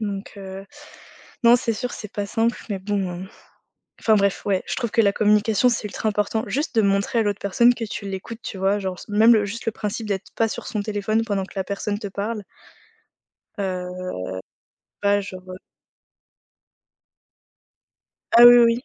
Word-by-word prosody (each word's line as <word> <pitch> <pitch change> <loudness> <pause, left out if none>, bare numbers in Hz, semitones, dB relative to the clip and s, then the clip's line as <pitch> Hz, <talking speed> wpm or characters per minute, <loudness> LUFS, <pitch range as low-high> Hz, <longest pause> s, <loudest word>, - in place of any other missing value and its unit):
Donc 200 -2 -4
heu, 195 0 -8 0.8
non, 235 +1 +8
c'est 235 -1 -1
sûr, 245 +3 -4
c'est 210 -1 -8
pas 205 -1 -3
simple, 225 +3 0
mais 200 -3 -2
bon, 190 -2 -3
heu. 190 - -9 0.7
Enfin 220 - +4
bref, 200 -2 +1
ouais, 195 -2 +1
je - - -2
trouve 235 -4 -3
que 230 - +4
la 200 - +4
communication, 210 +3 +3
c'est 235 - -2
ultra 220 - -4
important, 210 +1 -1
juste 290 -1 -2
de 225 - +5
montrer 200 +3 +1
à - - +4
l'autre 205 -1 -1
personne 235 +5 +4
que 235 - -6
tu 205 -1 -6
l'écoutes. 195 +4 -6
Tu 195 - -6
vois? 195 +2 +2
Genre 190 -2 -3
s - - -12
même 220 +3 +6
le 210 -2 +3
juste 215 +4 -6
le 225 - +1
principe 215 +1 -4
d'être 195 -2 -3
pas 225 - +2
sur - - -6
son 210 - -2
téléphone 215 +1 -1
pendant 200 -3 -1
que - - -16
la 190 - -1
personne 205 +1 -3
te 210 - -5
parle. 205 +2 -4 1.2
Heu, 185 -1 -4 1.0
ouais, 205 0 +3
genre, 185 -2 -9
heu - - -7 2.8
Ah, 240 +1 +10
oui, 240 0 +10
oui. 235 +1 +3
205 Hz, 185 wpm, -23 LUFS, 195-225 Hz, 2.8 s, Ah